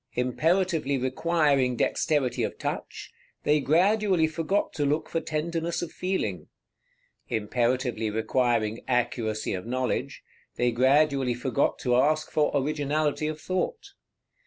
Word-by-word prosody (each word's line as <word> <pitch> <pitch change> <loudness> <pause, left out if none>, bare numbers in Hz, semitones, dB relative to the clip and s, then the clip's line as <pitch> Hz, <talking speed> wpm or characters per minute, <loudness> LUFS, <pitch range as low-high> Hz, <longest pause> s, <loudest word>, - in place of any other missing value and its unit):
Imperatively 155 +3 +1
requiring 135 -1 +1
dexterity 145 +1 0
of - - -2
touch, - - -5 0.3
they 150 +1 +3
gradually 185 +4 +3
forgot 165 +5 -1
to 145 - -1
look 145 +2 0
for 165 - -2
tenderness 165 +2 -2
of 170 - -6
feeling; 110 - -3 0.8
imperatively 120 +1 0
requiring 110 0 0
accuracy 120 -4 -1
of 95 +3 -5
knowledge, 130 +1 -2 0.3
they 120 0 +1
gradually 135 +1 +3
forgot 130 +3 0
to 125 -1 +1
ask 155 +4 +2
for 150 -1 +2
originality 150 +1 0
of 155 0 -4
thought. 405 - -3
140 Hz, 115 wpm, -27 LUFS, 125-160 Hz, 0.8 s, they